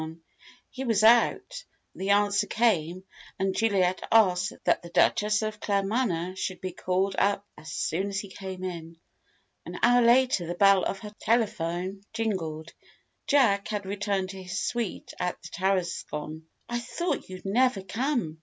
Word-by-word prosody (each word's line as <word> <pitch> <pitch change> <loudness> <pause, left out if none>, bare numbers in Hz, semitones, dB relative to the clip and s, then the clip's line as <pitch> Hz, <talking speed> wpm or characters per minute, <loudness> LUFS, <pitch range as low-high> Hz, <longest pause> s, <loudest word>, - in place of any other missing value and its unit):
He 265 - -5
was 225 -4 +1
out, 240 - +4 0.3
the 190 +1 -4
answer 205 0 +3
came, 185 -6 +1 0.3
and 190 0 0
Juliet 190 -5 +1
asked 185 -5 +4
that - - +2
the 170 - -10
Duchess 210 +4 +2
of 215 -1 -4
Claremanagh 195 -3 -1
should 185 -1 -3
be 185 - -4
called 185 +2 -1
up 200 0 +1
as 155 +1 -11
soon 190 +7 -1
as 195 -1 -2
he 200 - -6
came 190 -1 -8
in. 165 -2 -6 0.7
An - - -7
hour 245 +1 +6
later 240 -6 +4
the 175 - -3
bell 195 0 +5
of 195 - -2
her 210 -1 -9
telephone 195 -4 -1
jingled. 170 -8 -3 0.5
Jack 230 -9 +3
had 205 -2 -3
returned 195 -1 -2
to 190 -1 -9
his 180 -1 -4
suite 235 -5 -3
at 180 0 -2
the - - -8
Tarascon. 170 -4 -2 0.2
"I 240 0 -2
thought 340 - -3
you'd 185 +1 -9
never 225 0 +2
come!" 225 - -2
195 Hz, 155 wpm, -27 LUFS, 180-220 Hz, 0.7 s, hour